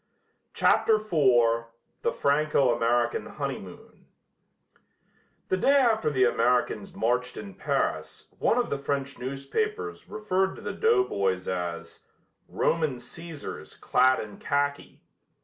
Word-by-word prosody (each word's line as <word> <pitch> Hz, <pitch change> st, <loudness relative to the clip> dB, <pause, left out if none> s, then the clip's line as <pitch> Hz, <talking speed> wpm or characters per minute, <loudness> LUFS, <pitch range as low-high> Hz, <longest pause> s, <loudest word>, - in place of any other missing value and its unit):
CHAPTER 220 Hz, -, +4 dB
IV 125 Hz, -, +2 dB, 0.4 s
THE -, -, +1 dB
FRANCO 140 Hz, -3 st, +2 dB
AMERICAN 120 Hz, +1 st, 0 dB
HONEYMOON -, -, -7 dB, 1.4 s
The 185 Hz, -, +2 dB
day 275 Hz, +9 st, +3 dB
after 230 Hz, -, +3 dB
the 130 Hz, -3 st, +2 dB
Americans 120 Hz, -3 st, +1 dB
marched 125 Hz, +2 st, -1 dB
in 100 Hz, -2 st, -8 dB
Paris -, -, -2 dB
one 230 Hz, -, +2 dB
of 245 Hz, -, 0 dB
the 140 Hz, -, -1 dB
French 140 Hz, -1 st, -3 dB
newspapers 420 Hz, -, -3 dB
referred 190 Hz, -3 st, -1 dB
to -, -, -11 dB
the -, -, -4 dB
doughboys 100 Hz, -, +1 dB
as 90 Hz, -2 st, -4 dB, 0.5 s
"Roman 155 Hz, -5 st, 0 dB
Cæsars 155 Hz, +5 st, -9 dB
clad 130 Hz, +1 st, +3 dB
in 105 Hz, -1 st, -8 dB
khaki." 145 Hz, 0 st, -2 dB
140 Hz, 115 wpm, -27 LUFS, 120-185 Hz, 1.4 s, CHAPTER